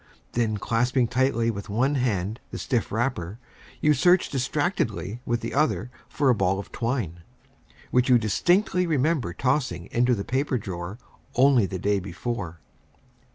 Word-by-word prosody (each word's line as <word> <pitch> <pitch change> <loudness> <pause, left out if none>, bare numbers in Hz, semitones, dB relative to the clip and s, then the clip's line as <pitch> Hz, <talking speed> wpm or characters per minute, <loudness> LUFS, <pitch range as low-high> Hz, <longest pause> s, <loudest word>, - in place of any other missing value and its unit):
Then, 110 -3 0
clasping 120 +4 +1
tightly 120 -2 +1
with 100 0 -7
one 125 +8 +1
hand 110 -5 -1
the - - -6
stiff 120 -5 -1
wrapper, 110 -5 -2 0.4
you 150 - +5
search 175 +6 +4
distractedly 125 - -1
with 120 0 0
the - - -4
other 145 -3 +1 0.2
for 145 - 0
a - - +5
ball 95 -3 +1
of 100 - -7
twine, 115 - -2 0.7
which 125 +1 +3
you 125 - +7
distinctly 175 - +2
remember 150 - +1
tossing 125 - -1
into 120 +1 +3
the 100 - -4
paper 130 +1 0
drawer 95 -1 -6 0.4
only 130 -5 +5
the 95 - -4
day 100 +2 +1
before. 90 -2 -5
120 Hz, 150 wpm, -25 LUFS, 100-135 Hz, 0.7 s, you